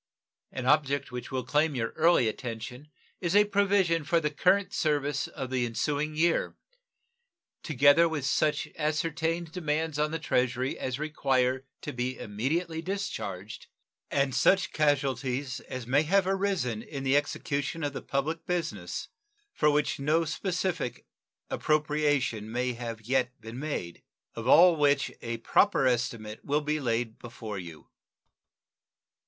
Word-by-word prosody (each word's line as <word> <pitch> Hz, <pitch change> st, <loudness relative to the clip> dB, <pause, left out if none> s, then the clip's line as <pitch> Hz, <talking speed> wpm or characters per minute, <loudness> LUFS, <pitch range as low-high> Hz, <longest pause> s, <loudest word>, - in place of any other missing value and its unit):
An 130 Hz, -, -5 dB
object 140 Hz, -1 st, +2 dB
which 125 Hz, 0 st, -6 dB
will 130 Hz, -2 st, -2 dB
claim 150 Hz, +3 st, +2 dB
your 115 Hz, -2 st, -1 dB
early 160 Hz, -7 st, +4 dB
attention 120 Hz, +4 st, -5 dB, 0.3 s
is 175 Hz, 0 st, -1 dB
a 205 Hz, 0 st, +7 dB
provision 200 Hz, -5 st, +2 dB
for 170 Hz, +2 st, +2 dB
the 150 Hz, -2 st, -1 dB
current 190 Hz, +5 st, +2 dB
service 145 Hz, -2 st, 0 dB
of 130 Hz, -1 st, -6 dB
the 130 Hz, -1 st, +1 dB
ensuing 145 Hz, +6 st, -1 dB
year, 165 Hz, +2 st, +1 dB, 1.0 s
together 150 Hz, +3 st, +5 dB
with 150 Hz, -4 st, -3 dB
such 150 Hz, +3 st, +1 dB
ascertained 160 Hz, +2 st, -1 dB
demands 160 Hz, -3 st, -1 dB
upon 150 Hz, 0 st, +2 dB
the 165 Hz, -, -2 dB
Treasury 130 Hz, -4 st, 0 dB
as 130 Hz, -1 st, -3 dB
require 135 Hz, -3 st, 0 dB
to -, -, -5 dB
be 125 Hz, +1 st, -2 dB
immediately 160 Hz, -, -2 dB
discharged, 110 Hz, -, -5 dB, 0.4 s
and 140 Hz, -2 st, +1 dB
such 190 Hz, +7 st, +3 dB
casualties 135 Hz, -3 st, 0 dB
as 130 Hz, -2 st, -7 dB
may 135 Hz, +4 st, +3 dB
have 190 Hz, +5 st, +2 dB
arisen 190 Hz, -, 0 dB
in 135 Hz, +2 st, -7 dB
the 135 Hz, +1 st, +2 dB
execution 145 Hz, +2 st, -1 dB
of 145 Hz, -1 st, -1 dB
the -, -, -5 dB
public 150 Hz, +4 st, -2 dB
business, 175 Hz, -1 st, -3 dB, 0.4 s
for 150 Hz, -, +3 dB
which 150 Hz, -1 st, +1 dB
no 155 Hz, +4 st, +2 dB
specific 175 Hz, -, -2 dB, 0.5 s
appropriation 145 Hz, -8 st, +1 dB
may 125 Hz, +1 st, -1 dB
have 115 Hz, -1 st, -6 dB
yet 125 Hz, +2 st, 0 dB
been 115 Hz, +3 st, -8 dB
made; 135 Hz, -, -4 dB, 0.3 s
of 115 Hz, +1 st, -6 dB
all 170 Hz, +5 st, +7 dB
which 145 Hz, -1 st, +2 dB
a 115 Hz, 0 st, -3 dB
proper 135 Hz, -, +3 dB
estimate 115 Hz, -3 st, -1 dB
will 145 Hz, +2 st, +1 dB
be 150 Hz, +1 st, -1 dB
laid 115 Hz, -3 st, -1 dB
before 115 Hz, -4 st, -7 dB
you. 85 Hz, -3 st, -10 dB
145 Hz, 140 wpm, -28 LUFS, 125-160 Hz, 1.0 s, a